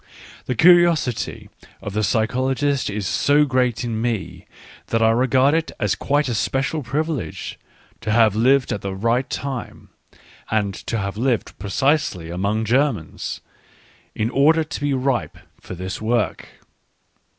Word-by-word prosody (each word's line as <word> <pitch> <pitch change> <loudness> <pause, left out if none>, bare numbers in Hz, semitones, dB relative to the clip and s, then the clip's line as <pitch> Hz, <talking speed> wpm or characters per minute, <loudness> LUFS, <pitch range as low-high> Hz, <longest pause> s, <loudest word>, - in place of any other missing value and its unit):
The 125 - -1
curiosity 170 -5 +3 0.3
of 100 - -7
the 110 - 0
psychologist 130 +5 0
is 105 -1 -3
so 145 +9 +3
great 125 -4 0
in 115 -2 -2
me, 115 -6 -3 0.4
that 115 0 +1
I 110 - +5
regard 130 +4 +3
it 165 0 0
as 105 - +1
quite 145 +1 0
a 120 - -1
special 135 +7 -1
privilege 145 - -3 0.4
to 110 - -5
have 110 -2 +4
lived 130 +4 +3
at 100 - -4
the 95 -1 -4
right 115 +6 0
time, 135 -2 -5 0.6
and 105 -3 0
to 115 - -4
have 100 -1 -3
lived 120 -1 0
precisely 105 - 0
among 100 +5 -1
Germans, 125 - -1 0.7
in 110 +2 -1
order 155 +4 +4
to 150 -2 -7
be 145 -1 +1
ripe 130 -1 -1 0.2
for - - -8
this 95 +4 -5
work. 115 +1 -1
120 Hz, 140 wpm, -21 LUFS, 110-140 Hz, 0.7 s, I